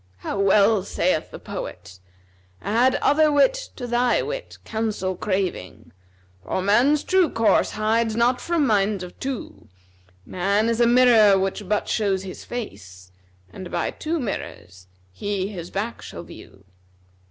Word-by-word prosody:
How 200 Hz, -, -3 dB
well 200 Hz, +1 st, +4 dB
saith 180 Hz, -3 st, -1 dB
the -, -, -9 dB
poet, 90 Hz, +1 st, -8 dB, 0.6 s
'Add 240 Hz, -, +2 dB
other 305 Hz, +1 st, +4 dB
wit 290 Hz, -, +4 dB, 0.2 s
to 245 Hz, -, -6 dB
thy 240 Hz, 0 st, +1 dB
wit, -, -, -6 dB
counsel 215 Hz, -4 st, -2 dB
craving, 185 Hz, -, -3 dB, 0.3 s
* 95 Hz, 0 st, -34 dB
For 95 Hz, -, -2 dB
man's 250 Hz, +9 st, +3 dB
true 370 Hz, -4 st, +3 dB
course 225 Hz, -1 st, +2 dB
hides 220 Hz, +1 st, 0 dB
not 245 Hz, +2 st, +2 dB
from 335 Hz, -4 st, +1 dB
minds 205 Hz, -4 st, +1 dB
of 180 Hz, -, -11 dB
two 265 Hz, -3 st, -6 dB, 0.6 s
Man 200 Hz, +5 st, 0 dB
is 230 Hz, +1 st, 0 dB
a 235 Hz, -, +5 dB
mirror 235 Hz, -5 st, +6 dB
which 195 Hz, +1 st, -3 dB
but 210 Hz, -1 st, 0 dB
shows 195 Hz, -3 st, 0 dB
his 185 Hz, -1 st, -8 dB
face, 95 Hz, -, -8 dB, 0.2 s
* 90 Hz, 0 st, -31 dB
And 185 Hz, -2 st, -8 dB
by -, -, -2 dB
two 325 Hz, +2 st, -3 dB
mirrors 95 Hz, -, -6 dB, 0.2 s
he 195 Hz, -, -3 dB
his 175 Hz, -4 st, -7 dB
back 215 Hz, +4 st, -4 dB
shall -, -, -8 dB
view.' 95 Hz, 0 st, -14 dB
210 Hz, 150 wpm, -23 LUFS, 185-240 Hz, 0.6 s, mirror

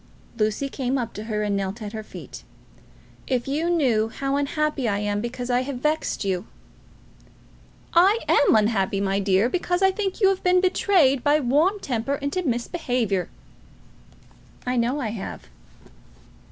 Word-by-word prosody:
Lucy 215 Hz, +4 st, 0 dB
came 270 Hz, -1 st, -2 dB
up 235 Hz, -3 st, -3 dB
to 210 Hz, -, -7 dB
her 210 Hz, -2 st, -2 dB
and 205 Hz, -1 st, 0 dB
knelt 195 Hz, +2 st, -3 dB
at 210 Hz, -1 st, -7 dB
her 220 Hz, -, -4 dB
feet. 215 Hz, -, -10 dB, 0.9 s
"If 250 Hz, -2 st, -1 dB
you 305 Hz, +5 st, 0 dB
knew 245 Hz, -10 st, +2 dB
how 275 Hz, +4 st, -2 dB
unhappy 285 Hz, -2 st, 0 dB
I 200 Hz, -, 0 dB
am 205 Hz, 0 st, -1 dB
because 245 Hz, +1 st, -4 dB
I 245 Hz, +1 st, +3 dB
have 270 Hz, +1 st, -4 dB
vexed 300 Hz, -3 st, -1 dB
you!" 190 Hz, +1 st, -2 dB, 1.5 s
"I 380 Hz, +6 st, +5 dB
am 285 Hz, -, +4 dB
unhappy, 205 Hz, -3 st, +2 dB
my 195 Hz, 0 st, 0 dB
dear, 195 Hz, +2 st, +2 dB
because 355 Hz, +5 st, -1 dB
I 385 Hz, -, +5 dB
think 385 Hz, +1 st, -3 dB
you 390 Hz, -3 st, +5 dB
have 385 Hz, -1 st, -1 dB
been 360 Hz, 0 st, +4 dB
betrayed 365 Hz, -, +3 dB
by 295 Hz, +1 st, +4 dB
warm 305 Hz, -, +2 dB
temper 255 Hz, -, -2 dB
into 285 Hz, +6 st, -2 dB
misbehaviour." 240 Hz, -, -1 dB, 1.4 s
"I 250 Hz, 0 st, -1 dB
know 245 Hz, +4 st, +1 dB
I 235 Hz, -6 st, -2 dB
have." 210 Hz, -3 st, -7 dB
255 Hz, 155 wpm, -24 LUFS, 215-305 Hz, 1.5 s, I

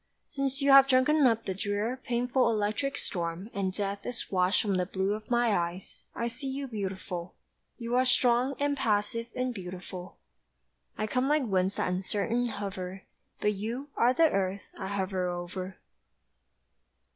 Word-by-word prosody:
Since 275 Hz, -1 st, -2 dB
you 280 Hz, -, +5 dB
have 270 Hz, 0 st, +9 dB
drunken 270 Hz, +2 st, +5 dB
up 230 Hz, -1 st, +1 dB
the 190 Hz, -, -1 dB
drear 205 Hz, +5 st, -1 dB
Painful 245 Hz, +1 st, +2 dB
electric 215 Hz, +5 st, 0 dB
storm, 175 Hz, +4 st, -3 dB
and 195 Hz, -2 st, -1 dB
death 200 Hz, +1 st, -3 dB
Is 245 Hz, -2 st, -5 dB
washed 185 Hz, 0 st, +3 dB
from 200 Hz, -3 st, +1 dB
the 180 Hz, -, +1 dB
blue 190 Hz, +1 st, 0 dB
Of 215 Hz, 0 st, -7 dB
my 240 Hz, -3 st, +3 dB
eyes, 175 Hz, +2 st, -3 dB
I 235 Hz, -, -1 dB
see 250 Hz, +4 st, -4 dB
you 275 Hz, +1 st, -3 dB
beautiful. 190 Hz, -5 st, -5 dB, 0.4 s
You 235 Hz, 0 st, -2 dB
are 255 Hz, -, +5 dB
strong 250 Hz, +1 st, +3 dB
and 285 Hz, 0 st, +1 dB
passive 230 Hz, -1 st, 0 dB
and 255 Hz, 0 st, -1 dB
beautiful, 185 Hz, -1 st, -8 dB, 0.8 s
I 215 Hz, -, 0 dB
come 255 Hz, +4 st, 0 dB
like 300 Hz, 0 st, +3 dB
winds 190 Hz, -3 st, +1 dB
that -, -, 0 dB
uncertain 205 Hz, +6 st, 0 dB
hover; 195 Hz, -3 st, -5 dB, 0.4 s
But 210 Hz, -, +2 dB
you 230 Hz, +8 st, -4 dB
Are 240 Hz, -, +4 dB
the 330 Hz, +6 st, +3 dB
earth 195 Hz, 0 st, 0 dB
I 190 Hz, -, -5 dB
hover 190 Hz, -2 st, -1 dB
over. 180 Hz, +1 st, -5 dB
210 Hz, 160 wpm, -29 LUFS, 190-250 Hz, 0.8 s, have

